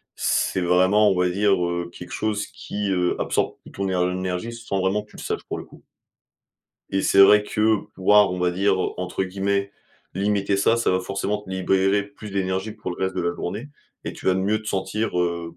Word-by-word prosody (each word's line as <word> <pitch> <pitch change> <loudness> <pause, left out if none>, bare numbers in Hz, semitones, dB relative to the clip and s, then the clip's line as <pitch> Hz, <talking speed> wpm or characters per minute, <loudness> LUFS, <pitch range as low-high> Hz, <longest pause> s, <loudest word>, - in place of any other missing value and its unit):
C'est 95 - 0
vraiment, 95 +4 +4
on 95 - 0
va 90 0 +3
dire, 100 +2 +2
heu, 85 0 -2
quelque 90 0 -11
chose 105 -1 -1
qui, 100 -1 -5
heu, 90 -1 +1
absorbe - - 0
toute - - -14
ton 100 0 -2
éner 90 -1 +1
énergie, 95 +5 -3
sans 115 -4 -3
vraiment 95 +3 0
que 105 - -24
tu - - -14
le - - -8
saches, - - -3
pour - - -5
le - - -7
coup. - - -17 1.1
Et 95 0 0
c'est 100 - +4
vrai 105 +1 +7
que 110 +1 +2 0.2
pouvoir, 105 +2 +5
on 90 - -4
va 90 0 +2
dire, 95 +2 +1 0.2
entre 90 +1 -2
guillemets, 100 +1 -1 0.4
«limiter» 100 0 +1
ça, 100 +4 +3
ça 115 - +1
va 95 0 +1
forcément 100 +2 -2
te 105 - -16
libérer 95 +2 +2
plus 100 +1 -11
d'énergie 95 +2 -2
pour 105 -2 -6
le - - -6
reste 95 0 -1
de 90 - 0
la 85 0 -1
journée 105 +11 -5 0.4
et - - -4
tu - - -10
vas 95 - +4
mieux 100 +3 +1
te 110 - -8
sentir, 100 +1 -1
heu, 85 -1 -2
95 Hz, 215 wpm, -23 LUFS, 90-105 Hz, 1.1 s, vrai